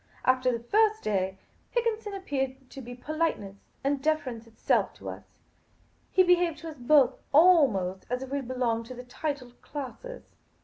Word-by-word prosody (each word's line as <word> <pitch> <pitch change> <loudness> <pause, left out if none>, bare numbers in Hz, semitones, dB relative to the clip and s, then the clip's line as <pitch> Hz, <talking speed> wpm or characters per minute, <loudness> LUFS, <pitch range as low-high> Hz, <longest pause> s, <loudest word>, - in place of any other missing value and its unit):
After 255 0 +3
the 235 -1 -4
first 435 - +2
day, 190 -2 0 0.3
Higginson 450 -3 -1
appeared 270 -7 -4
to 275 - -8
be 245 0 -8
politeness 275 -8 -2 0.3
and 275 0 0
deference 260 -7 -1
itself 225 - 0
to - - -8
us. - - -8 0.8
He 370 - +5
behaved 355 -2 +3
to 330 - -6
us 305 - -10
both, 260 0 +4
almost 275 - +4
as 250 +2 -2
if 265 - -9
we 280 0 -1
belonged 240 -3 -1
to 255 - -8
the 250 - -8
titled 250 -1 -5
classes. 295 - -7
265 Hz, 160 wpm, -28 LUFS, 245-325 Hz, 0.8 s, He